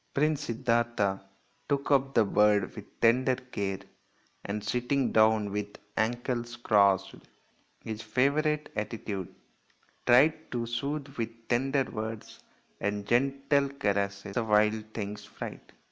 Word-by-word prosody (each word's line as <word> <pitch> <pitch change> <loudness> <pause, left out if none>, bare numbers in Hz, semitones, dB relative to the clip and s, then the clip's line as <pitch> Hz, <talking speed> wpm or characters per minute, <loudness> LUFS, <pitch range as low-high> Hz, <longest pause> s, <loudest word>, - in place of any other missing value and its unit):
Prince 150 0 +1
Siddartha 115 -4 +1 0.5
took 140 0 0
up 135 -1 +3
the 115 - +5
bird 105 -1 +3
with - - -12
tender 125 +3 +4
care, 100 -7 -4 0.6
and 100 +1 -4
sitting 125 +4 0
down 110 -2 +4
with 105 0 -4 0.2
ankles 120 +1 -1
crossed 100 -4 +3 0.7
his 110 -1 -5
favourite 145 +7 +1
attitude 105 -3 -4 0.8
tried 150 +6 +5
to 120 -1 -1
soothe 140 +5 -3
with 115 0 0 0.2
tender 135 +3 +2
words 110 -2 -6 0.4
and 100 0 -2
gentle 135 +4 +2
caresses 100 -6 -2
the 120 - 0
wild 105 0 +3
thing's 105 -1 -4
fright. 105 - -9
115 Hz, 115 wpm, -29 LUFS, 105-135 Hz, 0.8 s, the